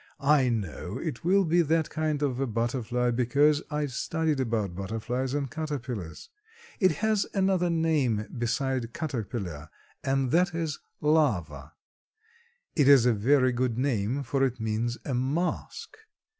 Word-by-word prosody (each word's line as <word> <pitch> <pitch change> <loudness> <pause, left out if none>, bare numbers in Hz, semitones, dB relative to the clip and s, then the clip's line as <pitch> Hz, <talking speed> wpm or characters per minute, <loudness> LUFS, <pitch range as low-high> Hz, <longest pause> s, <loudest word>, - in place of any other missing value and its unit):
I 140 -3 +4
know 105 -9 -3
it 115 - -5
will 190 +3 +3
be 170 +2 +3
that 160 0 +1
kind 155 -2 -1
of 130 -3 -1
a 135 - 0
butterfly 120 +1 -1
because 140 +5 +3
I've 150 -2 -2
studied 155 +2 -1
about 110 -7 -1
butterflies 115 +7 -3
and 145 -1 -1
caterpillars. 130 - -5 0.5
It 185 -5 +4
has 215 -2 +2
another 190 -2 +2
name 150 -10 +1
beside 125 0 -1
caterpillar 110 - -4 0.3
and 135 -1 0
that 180 +1 +2
is 160 -3 -2 0.2
larva. 90 - +1 1.0
It 145 -4 +3
is 140 -4 +7
a 125 - +4
very 130 +5 +3
good 120 -1 -1
name 125 0 0
for 135 +2 0
it 130 -2 0
means 110 +2 -1
a 135 - -2
mask. 145 - -2
130 Hz, 140 wpm, -27 LUFS, 115-150 Hz, 1.0 s, is